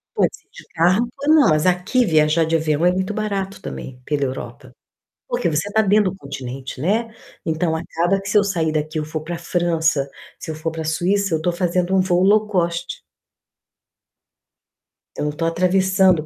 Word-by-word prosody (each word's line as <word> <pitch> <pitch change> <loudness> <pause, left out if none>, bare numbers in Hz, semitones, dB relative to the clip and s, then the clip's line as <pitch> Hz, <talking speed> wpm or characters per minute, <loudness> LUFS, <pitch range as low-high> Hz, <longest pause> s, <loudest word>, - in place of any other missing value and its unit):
Pode - - +3
ser - - -29
de - - -13
carro 185 +8 +3 0.2
ou 305 - +5
não, 310 - +6
mas 155 +1 +2
aqui 185 +8 +2
viajar 155 -2 +3
de 160 +1 0
avião 160 0 +1
é 180 - +5
muito 190 +2 -2
barato 200 -2 -3
também 130 -8 -7
pela 145 -2 -1
Europa, 130 0 -7 0.6
porque - - 0
você 160 +4 -1
tá 220 - +4
dentro 205 -2 +3
do - - -11
continente, 135 -4 -7
né, 220 - 0 0.3
então 160 +1 0
acaba 170 +4 0
que 195 - -7
se 210 - +4
eu 205 - +3
sair 170 -5 0
daqui 155 0 -2
eu 155 - -1
for 155 0 -5
pra 170 +1 -4
França, 165 -4 0 0.3
se - - -7
eu - - -3
for 155 +1 -3
pra 160 0 -5
Suíça, 180 +4 0
eu 160 - -1
tô 175 - +1
fazendo 180 +1 0
um - - +4
voo 180 -1 +2
low 210 +3 +4
cost. 175 -3 -2 2.1
Eu - - -2
não 150 - 0
tô 165 +3 -3
atravessando, 185 0 +3
175 Hz, 190 wpm, -21 LUFS, 155-195 Hz, 2.1 s, não